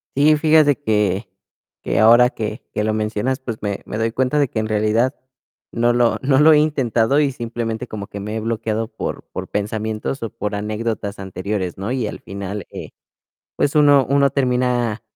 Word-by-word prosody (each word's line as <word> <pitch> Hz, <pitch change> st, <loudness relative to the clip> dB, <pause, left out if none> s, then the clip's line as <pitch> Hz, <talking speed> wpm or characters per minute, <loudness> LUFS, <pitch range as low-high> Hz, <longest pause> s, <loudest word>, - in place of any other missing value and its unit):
Sí, 150 Hz, +2 st, +5 dB
fíjate 155 Hz, -2 st, +4 dB
que 105 Hz, -6 st, 0 dB, 0.5 s
que -, -, 0 dB
ahora 120 Hz, +3 st, +6 dB
que 110 Hz, 0 st, -5 dB
que 105 Hz, -, -1 dB
lo 110 Hz, 0 st, 0 dB
mencionas, 110 Hz, +4 st, -1 dB
pues, 120 Hz, -4 st, -5 dB
me 100 Hz, -1 st, -3 dB
me 105 Hz, -, -5 dB
doy 115 Hz, +1 st, 0 dB
cuenta 130 Hz, +4 st, 0 dB
de 145 Hz, -, +3 dB
que 110 Hz, -, -3 dB
en 110 Hz, -, -2 dB
realidad 110 Hz, +4 st, +1 dB, 0.6 s
no 120 Hz, 0 st, +2 dB
lo 120 Hz, -1 st, +2 dB
no 135 Hz, 0 st, +3 dB
lo 155 Hz, +2 st, +7 dB
he -, -, +6 dB
intentado 135 Hz, -4 st, +2 dB
y 145 Hz, -2 st, +2 dB
simplemente 115 Hz, -1 st, -4 dB
como 100 Hz, -2 st, -7 dB
que 100 Hz, -, -8 dB
me 105 Hz, +2 st, -5 dB
he -, -, -1 dB
bloqueado 110 Hz, 0 st, -2 dB
por -, -, -5 dB
por -, -, -5 dB
pensamientos 110 Hz, +4 st, -3 dB
o 115 Hz, -, -3 dB
por 105 Hz, -2 st, -4 dB
anécdotas 105 Hz, 0 st, -3 dB
anteriores, 95 Hz, -1 st, -4 dB
¿no? 100 Hz, +5 st, -4 dB
Y 125 Hz, -4 st, -1 dB
al -, -, -7 dB
final, 100 Hz, 0 st, -6 dB
eh, -, -, -8 dB, 0.7 s
pues, 145 Hz, -, +1 dB
uno 145 Hz, -2 st, +6 dB
uno 140 Hz, 0 st, +3 dB
termina 125 Hz, -4 st, 0 dB
115 Hz, 185 wpm, -20 LUFS, 105-130 Hz, 0.7 s, lo